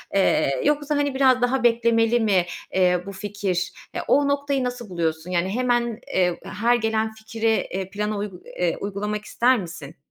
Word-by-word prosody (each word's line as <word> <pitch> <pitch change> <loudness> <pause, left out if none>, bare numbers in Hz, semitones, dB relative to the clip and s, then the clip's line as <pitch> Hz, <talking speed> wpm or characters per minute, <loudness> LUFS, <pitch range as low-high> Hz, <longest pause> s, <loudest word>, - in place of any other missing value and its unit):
Eee, 140 -8 +2
yoksa, 295 0 +1
hani, 285 -2 0
biraz 260 -2 +4
daha 250 +2 +1
beklemeli 230 0 +3
mi, 195 -5 +2 0.3
eee, 180 -1 +3
bu 200 - -6
fikir? 195 -2 -2 0.2
Ya, - - -3
o 285 0 +4
noktayı 280 -1 0
nasıl 245 -3 -4
buluyorsun? 165 -1 -2
Yani, 180 +1 +1
hemen, 240 0 0
eee, 180 -2 +2
her 235 +4 +1
gelen 220 -1 0
fikri, 220 +1 -2 0.2
eee, 190 0 -3
plana 210 +1 -2
uygu 200 -3 -5
eee, 175 -2 -2
uygulamak 210 +1 -3
ister 245 +1 +3
misin? 165 -6 -8
215 Hz, 165 wpm, -23 LUFS, 185-245 Hz, 0.3 s, biraz